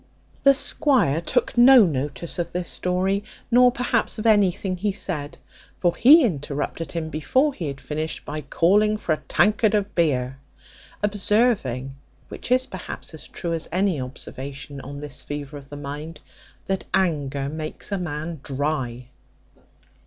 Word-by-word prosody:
The 275 0 +6
squire 265 - +2
took 245 +7 0
no 245 -1 +8
notice 150 +2 -2
of 170 0 -2
this 180 -1 -2
story, 190 +2 0 0.3
nor 250 +1 +6
perhaps 250 0 0
of 215 - -5
anything 195 -3 +3
he 205 +3 0
said; 170 -5 -4 0.4
for 175 -2 +2
he 295 +6 +8
interrupted 145 - -3
him 165 -2 -3
before 260 - +1
he 170 - -4
had 140 -1 -5
finished, 155 +2 -4
by 155 +1 -4
calling 205 +9 +3
for 175 -6 0
a - - -1
tankard 210 +5 +3
of 205 -1 -1
beer; 135 -6 0 0.6
observing 200 - +1 0.3
(which - - -8
is 255 0 +4
perhaps 190 -7 -8
as 160 - -9
true 170 -1 -4
as 165 -1 -4
any 185 -4 +1
observation 135 +2 -7
on 140 +2 -8
this 145 -1 -6
fever 145 0 -6
of 140 -1 -10
the 145 - -8
mind) 150 +3 -7 0.5
that 195 -1 -2
anger 145 -6 0
makes 155 +6 -5
a 200 - 0
man 160 -1 -4
dry. 135 -4 -3
165 Hz, 150 wpm, -23 LUFS, 145-205 Hz, 0.6 s, no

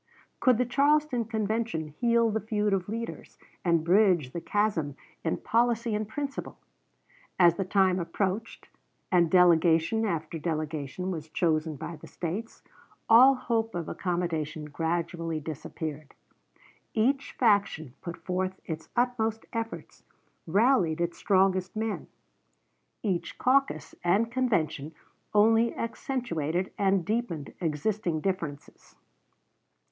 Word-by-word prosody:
Could 255 -4 +4
the 250 - +2
Charleston 280 -1 +2
Convention 220 -6 -2
heal 230 +7 +2
the 220 - 0
feud 210 -1 0
of 190 0 -1
leaders, 230 +2 -6 0.3
and 170 -3 +2
bridge 175 -6 +3
the 170 - -4
chasm 190 -10 0 0.3
in 160 - 0
policy 235 -1 +1
and 210 0 -1
principle? 280 +3 -5 0.8
As 175 -2 +6
the 195 +2 -3
time 190 -1 +3
approached, 190 +5 -3 0.4
and 175 -3 +4
delegation 175 +3 +4
after 165 -5 -2
delegation 155 +2 -3
was 160 -3 -6
chosen 155 -1 0
by 165 +4 -7
the - - -12
States, 190 +7 -5 0.4
all 255 +4 +8
hope 230 -4 -1
of 170 -2 -3
accommodation 165 -4 -2
gradually 165 +1 -2
disappeared. 155 0 -6 0.8
Each 265 +5 +1
faction 200 - +1
put 170 -2 -6
forth 185 +1 -3
its 160 -1 -6
utmost 225 -3 0
efforts, 230 0 -5 0.5
rallied 190 -4 +3
its 170 0 -2
strongest 190 -1 +2
men. 220 0 -3 1.0
Each 190 -6 -2
caucus 275 +2 +1
and 205 +7 +2
convention 160 - 0 0.4
only 225 +2 +4
accentuated 190 - -2
and 195 -3 +2
deepened 210 - -2
existing 170 +1 -1
differences. 165 -7 -5
190 Hz, 115 wpm, -28 LUFS, 165-225 Hz, 1.0 s, all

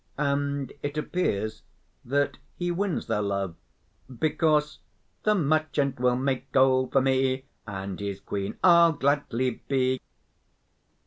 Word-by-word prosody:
And 140 -1 -1
it 145 +1 -4
appears 110 - -1 0.4
that 140 +1 0 0.2
he 175 0 -2
wins 190 0 -1
their 105 - 0
love 100 -3 -1 0.7
because: 150 0 +1 0.4
The 215 0 +3
merchant 155 -5 +1
will 125 0 +3
make 135 +1 -2
gold 130 -1 +3
for 135 - +5
me 130 0 +1 0.2
And 95 -2 -5
his 100 -1 -4
queen 100 0 -4
I'll 170 -2 +7
gladly 135 -4 0
be. 130 -1 +1
135 Hz, 120 wpm, -27 LUFS, 125-150 Hz, 0.7 s, I'll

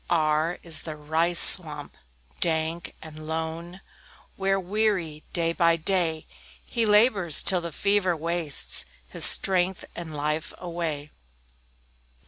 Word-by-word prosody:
R - - 0 0.4
R - - -14
is 165 -2 +2
the 155 -2 -8
"Rice 160 +3 +1
swamp, 150 -5 +5 0.4
dank 160 0 -3
and 155 -1 -12
lone," 165 +3 -7 0.5
Where, 195 0 -2
weary, 185 -5 -3
day 165 -1 -2
by 170 -1 +1
day, 165 -2 -2 0.4
He 230 -2 -2
labors 210 - +3
till 185 -2 -1
the 170 0 -7
fever 200 -1 -1
wastes 165 -2 -1 0.2
His - - +6
strength 185 -1 +3
and 165 -3 -9
life 150 +2 -4
away. 165 -4 -6
170 Hz, 120 wpm, -24 LUFS, 160-185 Hz, 0.5 s, His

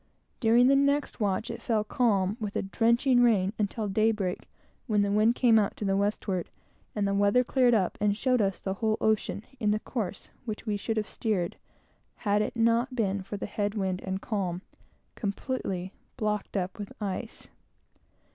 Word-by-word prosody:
During 235 +1 +5
the 275 +2 +5
next 280 0 +1
watch 205 0 0
it - - -7
fell 220 -3 +1
calm, 210 -4 +1
with 210 -2 -4
a - - 0
drenching 235 +5 +3
rain, 205 -5 +3
until 210 +1 -1
daybreak, 210 -2 0 0.4
when 210 -3 +2
the 200 - 0
wind 215 +3 +3
came 230 -4 +5
out 205 - -1
to 210 - -3
the 195 0 +2
westward, 200 -3 -1 0.5
and 205 -2 +1
the 200 - 0
weather 205 +5 +3
cleared 250 -1 +3
up, 190 -5 0
and 205 -1 +2
showed 255 -1 +2
us 195 -2 0
the 190 - -3
whole 220 +2 0
ocean, 215 -1 0 0.2
in 215 -3 +1
the 210 +1 +2
course 215 -6 -5 0.2
which 215 -2 -5
we 210 -2 0
should 220 +2 -2
have 215 -1 -1
steered, 200 -7 -2 0.6
had 205 -1 +1
it 215 - -2
not 230 +3 +2
been 200 -4 0
for 195 +2 -6
the - - -4
head 205 0 -2
wind 190 -3 -1
and 190 0 -4
calm, 185 -4 -2 0.5
completely 200 -3 -3 0.2
blocked 210 -1 -2
up 185 +2 -3
with 205 - -6
ice. 210 +3 -5
210 Hz, 180 wpm, -28 LUFS, 195-230 Hz, 0.6 s, During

